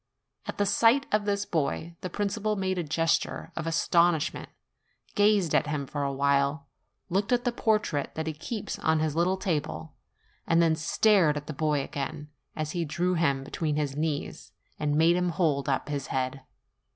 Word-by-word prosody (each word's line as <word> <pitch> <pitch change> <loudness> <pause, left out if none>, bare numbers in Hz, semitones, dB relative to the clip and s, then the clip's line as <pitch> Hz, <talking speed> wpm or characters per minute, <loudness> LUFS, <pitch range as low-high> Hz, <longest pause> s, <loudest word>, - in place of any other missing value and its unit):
At - - -5
the 205 - +2
sight 235 +7 +4
of 210 -1 +1
this 205 0 0
boy, 165 0 -2
the 185 - -4
principal 210 +3 -1
made 190 -2 -1
a - - -1
gesture 165 +2 0
of 165 0 -4
astonishment, 165 -1 +2 0.6
gazed 205 -5 +3
at - - +3
him 150 -2 -2
for 145 +2 -4
a 140 -1 0
while, 140 +1 +1 0.5
looked 200 +5 0
at 245 -1 +2
the 245 - +1
portrait 215 -11 0
that 160 - -3
he 160 - -2
keeps 200 +8 -5
on 160 0 +2
his 155 -1 -1
little 180 +3 +2
table, 145 - -3 0.5
and 165 - +3
then 165 -1 +4
stared 165 0 +3
at 150 - -6
the 155 - -5
boy 150 -1 0
again, 145 +2 -5 0.3
as 155 -1 -3
he 175 -2 -1
drew 175 +4 0
him 140 -6 +1
between 150 +2 -2
his 145 -2 -1
knees, 150 -1 -3 0.3
and 145 -1 0
made 165 +3 +4
him 180 0 +1
hold 155 -6 0
up 135 - 0
his 145 -2 -3
head. 130 +1 -2
160 Hz, 180 wpm, -28 LUFS, 145-185 Hz, 0.6 s, sight